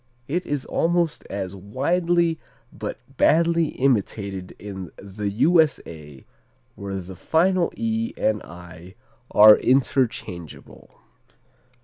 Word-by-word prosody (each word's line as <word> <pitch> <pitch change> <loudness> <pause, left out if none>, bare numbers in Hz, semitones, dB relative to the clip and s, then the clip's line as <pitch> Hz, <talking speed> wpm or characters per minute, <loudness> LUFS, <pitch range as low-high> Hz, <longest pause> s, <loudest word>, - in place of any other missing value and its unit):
It 175 +6 -2
is 145 -2 -2
almost 170 -1 0
as 95 -1 -5
widely 165 - 0 0.3
but - - -6 0.2
badly 170 0 +3
imitated 100 -8 -2
in 95 -4 -8
the 100 +1 -5
U.S.A., 100 - 0 0.5
where 100 -1 -6
the 95 0 -7
final 175 - +1
"e" 230 0 -1
and 110 -1 0
"i" 90 +2 -12 0.3
are 105 0 +8
interchangeable. 125 - -2
110 Hz, 95 wpm, -23 LUFS, -, 0.5 s, are